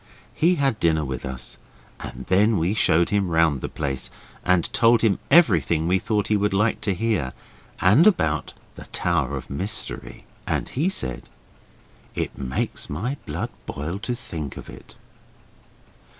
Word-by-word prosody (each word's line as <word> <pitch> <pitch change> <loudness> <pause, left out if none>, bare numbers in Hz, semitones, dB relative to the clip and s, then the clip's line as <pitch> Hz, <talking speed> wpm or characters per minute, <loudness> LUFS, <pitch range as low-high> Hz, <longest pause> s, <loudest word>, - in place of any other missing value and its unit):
He 175 +3 +3
had 135 -8 0
dinner 80 -2 +2
with 65 -2 -4
us, 65 -1 -7 0.4
and 65 +2 -8
then 105 +3 +3
we 85 +4 +1
showed 85 -5 +3
him 100 -3 +1
round 80 -5 +2
the - - -4
place, 70 -3 -4 0.3
and 90 -1 +3
told 115 -1 +4
him 105 -4 +3
everything 85 - +4
we 95 +2 +3
thought 105 +1 0
he 105 - +3
would 105 -1 +1
like 105 +3 +1
to 100 -3 0
hear, 90 - -1 0.5
and 110 - +6
about 80 - +1 0.2
the - - -11
Tower 85 -7 -1
of - - -9
Mystery, 100 +10 -3 0.2
and - - -1
he 155 +8 0
said 65 - -3 0.9
'It - - -3
makes 65 -1 -3
my 110 - -2
blood - - -3 0.2
boil 85 +7 -4
to 120 +3 -3
think 80 - -6
of - - -9
it. - - -14
95 Hz, 155 wpm, -24 LUFS, 75-110 Hz, 0.9 s, and